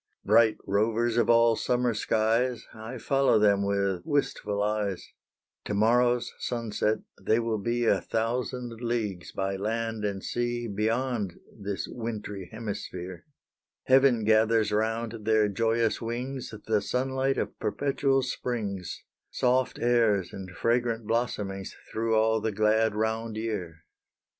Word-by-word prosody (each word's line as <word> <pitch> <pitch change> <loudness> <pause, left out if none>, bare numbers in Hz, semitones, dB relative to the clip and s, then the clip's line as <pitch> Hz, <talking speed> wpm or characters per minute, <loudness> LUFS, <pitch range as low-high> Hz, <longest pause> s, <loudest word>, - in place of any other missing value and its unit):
Bright 115 -2 +5
rovers 115 +3 +1
of 120 - +2
all 115 -1 +5
summer 125 +1 +1
skies, 115 +3 +1
I 110 +3 -7
follow 135 0 +3
them 100 -2 +4
with 100 -2 0
wistful 105 -7 -1
eyes 105 -3 -1 0.6
To 105 - -2
morrow's 120 +3 +3
sunset 110 -2 -1 0.2
they 110 - +2
will 115 -2 -1
be 120 +3 0
A - - +3
thousand 120 +1 -2
leagues 110 -7 -2
by 95 0 -2
land 110 +1 -2
and 100 -2 -2
sea 120 0 -2
Beyond 110 -1 -1 0.2
this 100 -2 -4
wintry 105 -5 -5
hemisphere 95 -5 -6 0.6
Heaven 130 -3 +4
gathers 110 0 +3
round 110 +1 -1
their 110 -1 +4
joyous 115 +2 +1
wings 125 +3 -4
The 110 -2 +2
sunlight 130 +3 0
of - - -3
perpetual 135 -1 +1
springs, 110 -8 -4 0.3
Soft 125 0 +1
airs 115 -6 +2
and 95 -1 -7
fragrant 115 +4 0
blossomings 105 -4 -2 0.2
Through 115 0 0
all 110 0 +3
the 110 +1 -1
glad 110 +1 +2
round 110 0 -1
year. 90 -8 -4
110 Hz, 125 wpm, -28 LUFS, 105-120 Hz, 0.6 s, Bright